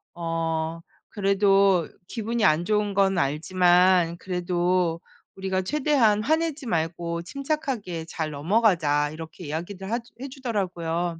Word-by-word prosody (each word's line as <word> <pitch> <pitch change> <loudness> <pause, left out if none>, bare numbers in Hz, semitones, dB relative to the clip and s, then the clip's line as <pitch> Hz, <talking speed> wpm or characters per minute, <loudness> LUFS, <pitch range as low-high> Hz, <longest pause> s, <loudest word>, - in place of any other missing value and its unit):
어 165 -1 -2 0.3
그래도 195 -3 +3 0.2
"기분이 230 0 -2
안 155 +1 +3
좋은 210 -1 0
건 195 -2 +3
알지만 175 +3 +3
그래도 180 -1 0 0.4
우리가 190 -1 -1
최대한 250 -4 +2
화내지 315 -1 0
말고 170 -3 -2
침착하게 265 - -3
잘 160 -2 -4
넘어가자." 150 -3 +2
이렇게 160 +2 -9
이야기를 180 +6 -5
하주 235 0 -3
해주더라고요. 180 - -3
185 Hz, 280 characters per minute, -25 LUFS, 165-215 Hz, 0.4 s, 그래도